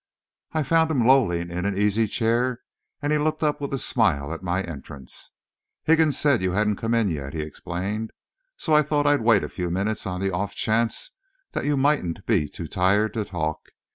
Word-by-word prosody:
I 155 Hz, -1 st, +1 dB
found 160 Hz, +3 st, +3 dB
him 130 Hz, -7 st, +1 dB
lolling 90 Hz, -10 st, +3 dB
in 90 Hz, +1 st, -3 dB
an 100 Hz, -1 st, -1 dB
easy 105 Hz, +2 st, +2 dB
chair, 120 Hz, +3 st, 0 dB, 0.4 s
and 145 Hz, +1 st, +1 dB
he 150 Hz, -, +2 dB
looked 155 Hz, +1 st, -1 dB
up 150 Hz, -1 st, 0 dB
with 140 Hz, -, -3 dB
a 135 Hz, -, 0 dB
smile 85 Hz, -, +1 dB
at 85 Hz, -, -7 dB
my 90 Hz, +1 st, -1 dB
entrance. 70 Hz, -5 st, -9 dB, 0.5 s
"Higgins 160 Hz, -3 st, +3 dB
said 140 Hz, -7 st, +3 dB
you 90 Hz, -1 st, 0 dB
hadn't 105 Hz, 0 st, +1 dB
come 115 Hz, +1 st, 0 dB
in 115 Hz, -3 st, +2 dB
yet," 70 Hz, -4 st, -4 dB
he 80 Hz, -, -2 dB
explained, 95 Hz, +8 st, -4 dB, 0.5 s
"so 160 Hz, -, -1 dB
I 150 Hz, -, +7 dB
thought 150 Hz, 0 st, 0 dB
I'd 145 Hz, -2 st, +3 dB
wait 110 Hz, -3 st, +4 dB
a -, -, -2 dB
few 90 Hz, -2 st, -4 dB
minutes 100 Hz, +4 st, -1 dB
on 90 Hz, -1 st, -3 dB
the 95 Hz, 0 st, 0 dB
off 100 Hz, +3 st, -2 dB
chance 115 Hz, +1 st, 0 dB, 0.4 s
that -, -, -3 dB
you 145 Hz, -1 st, +1 dB
mightn't 135 Hz, -, +1 dB
be 90 Hz, -10 st, +1 dB
too -, -, -7 dB
tired 100 Hz, +4 st, +2 dB
to 110 Hz, -, -1 dB
talk. 80 Hz, -5 st, -4 dB
105 Hz, 200 wpm, -24 LUFS, 90-135 Hz, 0.5 s, I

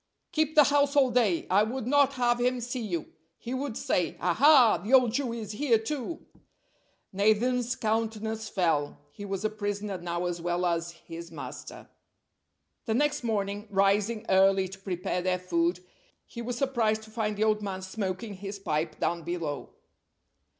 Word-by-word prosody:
"Keep 315 Hz, -2 st, 0 dB
the 300 Hz, -, +9 dB
house 285 Hz, 0 st, +2 dB
all 265 Hz, -3 st, +4 dB
day. 225 Hz, -8 st, +2 dB
I 195 Hz, +2 st, +5 dB
would 225 Hz, +3 st, -2 dB
not 280 Hz, +1 st, +3 dB
have 240 Hz, -2 st, +1 dB
him 250 Hz, +1 st, +1 dB
see 245 Hz, +2 st, -4 dB
you. 175 Hz, -8 st, -4 dB, 0.2 s
He 240 Hz, -, -6 dB
would 260 Hz, -3 st, -3 dB
say, 180 Hz, -, -1 dB
'Aha! 245 Hz, -, +5 dB
the 225 Hz, +6 st, -2 dB
old 250 Hz, -3 st, +5 dB
Jew 255 Hz, 0 st, -1 dB
is 225 Hz, -3 st, -5 dB
here, 235 Hz, +1 st, +2 dB
too.'" 275 Hz, +7 st, -5 dB, 0.9 s
Nathan's 235 Hz, +5 st, +2 dB
countenance 220 Hz, -1 st, -2 dB
fell. 165 Hz, -6 st, 0 dB
He 205 Hz, +7 st, -9 dB
was 195 Hz, +1 st, -3 dB
a -, -, +2 dB
prisoner 205 Hz, -2 st, -3 dB
now 175 Hz, 0 st, -3 dB
as 175 Hz, -1 st, -3 dB
well 175 Hz, +1 st, -1 dB
as 170 Hz, -1 st, 0 dB
his 170 Hz, 0 st, -10 dB
master. -, -, -9 dB, 1.0 s
The 220 Hz, -2 st, 0 dB
next 295 Hz, +1 st, +1 dB
morning, 205 Hz, -2 st, -2 dB
rising 205 Hz, +3 st, +1 dB
early 190 Hz, 0 st, +4 dB
to 195 Hz, +1 st, -10 dB
prepare 180 Hz, -1 st, -3 dB
their 185 Hz, 0 st, +1 dB
food, 175 Hz, 0 st, 0 dB, 0.4 s
he 235 Hz, -, -8 dB
was 240 Hz, +1 st, -4 dB
surprised 230 Hz, -5 st, +1 dB
to 220 Hz, -, -14 dB
find 215 Hz, -2 st, -2 dB
the 215 Hz, -, +1 dB
old 215 Hz, -1 st, +2 dB
man 190 Hz, -2 st, -4 dB
smoking 190 Hz, +2 st, -4 dB
his 195 Hz, +1 st, -7 dB
pipe 155 Hz, -5 st, -2 dB
down 170 Hz, 0 st, 0 dB
below. 165 Hz, -4 st, -4 dB
215 Hz, 165 wpm, -28 LUFS, 185-245 Hz, 1.0 s, the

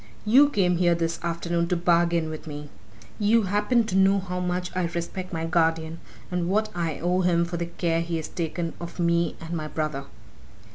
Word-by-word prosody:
You 265 Hz, +7 st, +6 dB
came 180 Hz, -8 st, +2 dB
here 175 Hz, -1 st, +3 dB
this 165 Hz, 0 st, -1 dB
afternoon 170 Hz, 0 st, -1 dB
to 180 Hz, -, +1 dB
bargain 170 Hz, -2 st, +2 dB
with 155 Hz, 0 st, -8 dB
me! 145 Hz, -1 st, -7 dB, 0.5 s
You 220 Hz, +2 st, +4 dB
happen 210 Hz, +5 st, +2 dB
to 215 Hz, -4 st, -3 dB
know 195 Hz, +1 st, +5 dB
how 180 Hz, -1 st, -3 dB
much 180 Hz, 0 st, -2 dB
I 185 Hz, -1 st, +1 dB
respect 175 Hz, +2 st, -5 dB
my 165 Hz, -2 st, -2 dB
guardian 165 Hz, -1 st, +1 dB, 0.3 s
and 180 Hz, -1 st, -1 dB
what 215 Hz, +3 st, +1 dB
I 165 Hz, -4 st, -2 dB
owe 180 Hz, +2 st, +1 dB
him 170 Hz, -1 st, +2 dB
for 170 Hz, 0 st, -4 dB
the 170 Hz, 0 st, -2 dB
care 170 Hz, -1 st, 0 dB
he 170 Hz, 0 st, -3 dB
has 160 Hz, -, -4 dB
taken 170 Hz, 0 st, -3 dB
of 170 Hz, +1 st, -8 dB
me 170 Hz, 0 st, +1 dB
and 165 Hz, +1 st, -7 dB
my 155 Hz, -2 st, -3 dB
brother. 150 Hz, -3 st, -3 dB
170 Hz, 195 wpm, -25 LUFS, 165-180 Hz, 0.5 s, You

